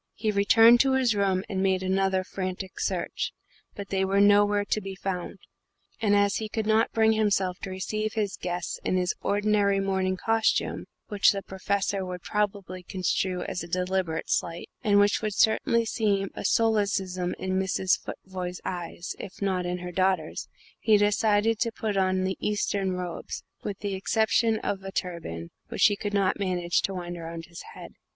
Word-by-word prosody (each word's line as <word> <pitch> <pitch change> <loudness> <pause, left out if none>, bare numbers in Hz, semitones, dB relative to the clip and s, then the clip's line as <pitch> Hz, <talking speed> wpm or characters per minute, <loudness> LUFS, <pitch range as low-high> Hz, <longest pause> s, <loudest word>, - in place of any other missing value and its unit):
He 215 0 0
returned 225 +4 +6
to 270 +1 +4
his 260 -3 +3
room 195 -2 +1
and 190 -2 -2
made 190 -1 +1
another 190 0 +1
frantic 185 0 -5
search - - -2 0.4
but 200 -1 -7
they 190 -1 +1
were 195 +1 +2
nowhere 205 0 +5
to 215 - -1
be 195 -1 -6
found; 185 0 -4 0.6
and 205 -2 +3
as 205 0 +3
he 220 -1 -4
could 220 0 -2
not 220 +1 +3
bring 220 0 +4
himself 200 -4 +1
to - - -6
receive 215 +3 -3
his 210 -3 -1
guests 175 -1 -4
in 185 - +1
his 180 0 +1
ordinary 205 -1 +2
morning 190 -1 0
costume 225 +3 +1 0.2
which 205 -2 +4
the 195 -1 -4
Professor 195 +1 -1
would 180 -1 -6
probably 200 -3 -2
construe 185 0 -1
as - - -4
a 170 - -6
deliberate 180 -1 -1
slight, 170 0 -2
and 205 -3 +4
which 205 0 +3
would 215 -2 -2
certainly 230 +1 +3
seem 200 -4 0
a - - -6
solecism 195 -5 +1
in 190 0 -1
Mrs. 190 0 +1
Futvoye's 180 -1 -6
eyes, 175 -1 -5
if 195 - -8
not 185 -3 0
in 180 0 -2
her 180 0 -6
daughter's 185 -3 0 0.3
he 215 -1 +4
decided 210 +1 +2
to 230 - +1
put 220 -2 -3
on 185 -1 +2
the 190 0 -1
Eastern 200 -2 0
robes, 180 -2 -5 0.2
with 200 -2 -4
the 200 -1 -2
exception 220 +3 +2
of 195 -1 -2
a 195 - -6
turban, 165 - -4 0.2
which - - -1
he 205 - +5
could 205 0 -4
not 200 -1 +1
manage 180 -3 0
to 195 - -2
wind 175 -1 -5
round 165 0 -7
his 170 +1 -10
head. - - -10
195 Hz, 175 wpm, -27 LUFS, 185-205 Hz, 0.6 s, returned